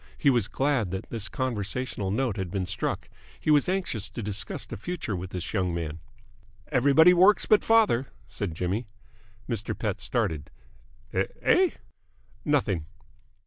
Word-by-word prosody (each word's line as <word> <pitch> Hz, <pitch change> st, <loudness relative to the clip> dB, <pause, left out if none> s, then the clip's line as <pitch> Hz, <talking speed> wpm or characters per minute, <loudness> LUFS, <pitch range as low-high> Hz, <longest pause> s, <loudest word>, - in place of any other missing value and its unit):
He 140 Hz, -, +4 dB
was 120 Hz, -6 st, +2 dB
glad 135 Hz, -8 st, 0 dB
that 95 Hz, +1 st, -5 dB
this 110 Hz, -3 st, -2 dB
conversational 120 Hz, -3 st, -2 dB
note 115 Hz, +1 st, 0 dB
had 95 Hz, -3 st, -3 dB
been 95 Hz, 0 st, -2 dB
struck. -, -, -2 dB, 0.3 s
He 155 Hz, -, +1 dB
was 150 Hz, +3 st, +4 dB
anxious 180 Hz, -, -1 dB
to 115 Hz, -, -6 dB
discuss 100 Hz, 0 st, -2 dB
the -, -, -7 dB
future 120 Hz, -, -4 dB
with 90 Hz, +1 st, -5 dB
this 90 Hz, -2 st, -5 dB
young 90 Hz, -4 st, 0 dB
man. 80 Hz, -1 st, -4 dB, 0.7 s
"Everybody 145 Hz, +6 st, +6 dB
works 190 Hz, +4 st, +5 dB
but 215 Hz, -, +4 dB
father!" 215 Hz, -, +4 dB, 0.2 s
said 95 Hz, -6 st, -4 dB
Jimmy. 95 Hz, +7 st, -2 dB, 0.6 s
Mr. 115 Hz, -3 st, -2 dB
Pett -, -, -2 dB
started. 75 Hz, -3 st, -1 dB, 0.6 s
"Eh?" 355 Hz, -, +2 dB, 0.7 s
"Nothing." 105 Hz, -, +1 dB
110 Hz, 145 wpm, -27 LUFS, 95-140 Hz, 0.7 s, Everybody